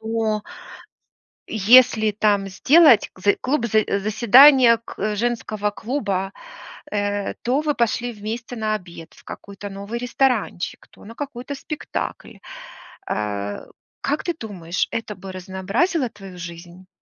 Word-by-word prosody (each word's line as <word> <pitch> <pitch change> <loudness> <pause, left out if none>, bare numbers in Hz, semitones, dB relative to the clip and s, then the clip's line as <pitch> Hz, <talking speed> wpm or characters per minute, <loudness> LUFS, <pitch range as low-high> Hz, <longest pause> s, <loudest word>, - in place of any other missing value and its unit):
Но, 220 -1 -1
а 210 - -14 1.1
если 220 0 +5
там 205 -1 +1
сделать 275 - +5
зэ 205 +2 +2
клуб 255 -2 0
за 215 -1 +2 0.2
заседание 235 +4 +6
к 210 0 -3
женского 215 -2 -1
клуба. 205 -5 -3 0.6
Э, 205 -1 -2
то 260 +5 +1
вы 300 -2 0
пошли 235 +1 -1
вместе 225 +3 -6
на 215 -1 -1
обед 170 -5 -9
в - - -19
какой-то 200 0 -9
новый 200 +4 -6
ресторанчик, 245 -6 -1
то - - -18
на 230 - -11
какой-то 275 -1 -6
спектакль. 305 +2 -6 0.7
Э, 100 -1 -3 0.4
как 290 +2 -1
ты 345 - -1
думаешь, 180 -6 -3
это 225 -2 -4
бы 190 0 -9
разнообразило 195 - -1
твою 195 -3 -12
жизнь? 175 +1 -10
215 Hz, 125 wpm, -22 LUFS, 195-245 Hz, 1.1 s, заседание